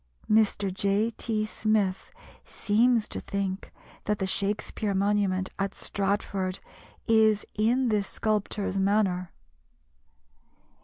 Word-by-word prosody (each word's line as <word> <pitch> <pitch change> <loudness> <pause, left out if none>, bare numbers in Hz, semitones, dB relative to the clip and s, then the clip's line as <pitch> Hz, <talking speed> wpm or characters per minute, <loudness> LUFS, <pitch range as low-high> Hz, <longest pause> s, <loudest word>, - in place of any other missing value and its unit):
Mr. 205 -3 +2
J. 200 +4 +1
T. 215 -1 -2
Smith 215 -3 0 0.3
seems 225 +1 +2
to - - -5
think 195 -1 -3 0.3
that 210 0 0
the 190 - -1
Shakspere 200 +1 -1
monument 195 -1 +1
at 195 0 -1
Stratford 195 -1 -2 0.5
is 220 -2 +4
in 240 +4 +2
this 205 -3 +1
sculptor's 210 -2 -1
manner. 190 -3 +1
205 Hz, 100 wpm, -27 LUFS, 195-215 Hz, 0.5 s, is